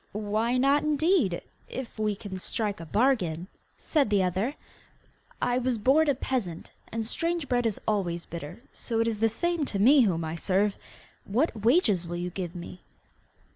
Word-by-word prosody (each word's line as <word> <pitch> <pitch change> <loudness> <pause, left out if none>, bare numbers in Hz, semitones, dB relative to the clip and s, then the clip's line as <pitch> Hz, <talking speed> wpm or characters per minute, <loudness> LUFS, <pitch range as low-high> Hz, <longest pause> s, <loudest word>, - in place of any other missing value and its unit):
'Why 215 +4 0
not, 275 +3 +4
indeed, 305 - +2 0.3
if 250 -4 -7
we 210 -1 +1
can 195 -1 -7
strike 210 0 -2
a 165 - -8
bargain?' 185 - +1 0.3
said 290 -8 +1
the 200 -2 +3
other. 190 +9 -1 0.9
'I 245 0 +2
was 250 -1 0
born 285 +8 +4
a 280 - +3
peasant, 230 -11 -3 0.2
and 225 0 -2
strange 335 +5 -2
bread 245 -2 +2
is 215 - -2
always 175 -5 0
bitter, 170 +7 -8
so 230 -2 -3
it 230 - +2
is 220 -2 -1
the 225 +1 +3
same 340 +8 -1
to 205 - -4
me 260 +8 +6
whom 170 -8 +1
I 160 +1 -4
serve! 195 +4 +1 0.5
What 245 +10 0
wages 225 - +3
will 175 +1 -4
you 175 +1 -3
give 180 -2 -5
me? 175 +1 -8
220 Hz, 175 wpm, -28 LUFS, 185-260 Hz, 0.9 s, me